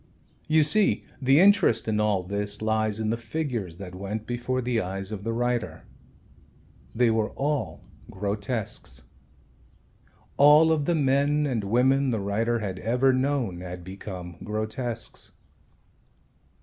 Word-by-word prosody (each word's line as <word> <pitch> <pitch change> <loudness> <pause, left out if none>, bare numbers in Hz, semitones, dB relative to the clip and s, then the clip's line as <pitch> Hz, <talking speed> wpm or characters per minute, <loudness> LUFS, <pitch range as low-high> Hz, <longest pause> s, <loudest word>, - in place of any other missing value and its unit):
You 155 0 +4
see 205 +8 +2 0.2
the 135 +3 +5
interest 200 - +4
in 105 -1 0
all 105 -3 +1
this 100 +2 -3
lies 110 -1 0
in 110 0 0
the 115 - -1
figures 115 - -4
that 90 -1 -8
went 100 +3 -5
before 120 +1 -2
the 120 -2 0
eyes 95 +1 -5
of 100 -2 -5
the 115 - -2
writer. 120 -1 -2 1.1
They 120 0 +3
were 110 0 +1
all 145 +1 -2 0.3
grotesques. 100 - -4 1.3
All 150 +3 +7
of 150 -3 +1
the 175 - +1
men 145 +1 +2
and 120 -7 -1
women 130 +6 +2
the 115 -3 0
writer 110 +4 0
had 95 -4 -4
ever 125 +5 +2
known 130 -8 0
had 90 -1 -7
become 90 -1 -8
grotesques. 110 +2 -4
115 Hz, 135 wpm, -26 LUFS, 100-135 Hz, 1.3 s, All